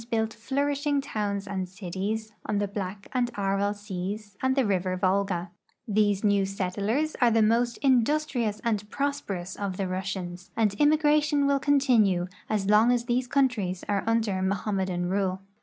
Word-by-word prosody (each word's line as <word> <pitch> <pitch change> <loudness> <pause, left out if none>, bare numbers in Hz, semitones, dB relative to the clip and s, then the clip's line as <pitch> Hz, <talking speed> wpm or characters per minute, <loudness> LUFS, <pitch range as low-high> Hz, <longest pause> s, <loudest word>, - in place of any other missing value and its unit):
'built 220 -1 0
flourishing 280 +5 0
towns 205 -7 -2
and 190 -2 -3
cities 205 +3 -4
on 210 - 0
the 205 0 0
Black 200 0 -5
and 250 -2 +1
Aral 200 +1 0
seas 205 +1 -6
and 260 +1 +1
river 190 -7 +1
Volga. 185 -1 0 0.4
These 205 -1 +2
new 205 -2 +3
settlers 200 +10 -1
are 240 - +6
the 225 -1 +3
most 235 +2 +2
industrious 255 -4 +2
and 210 -3 -1
prosperous 210 -11 -3
of 195 -2 -4
the 195 - -1
Russians, 185 -1 -4
and 215 -3 +2
immigration 295 -1 +3
will 280 0 +3
continue 240 -11 +3 0.2
as 210 -3 0
long 215 +3 +5
as 240 -1 +1
these 245 +1 0
countries 235 -10 0
are 200 -1 0
under 220 -4 +1
Mohammedan 190 -2 -1
rule. 190 0 -1
210 Hz, 150 wpm, -27 LUFS, 195-245 Hz, 0.4 s, are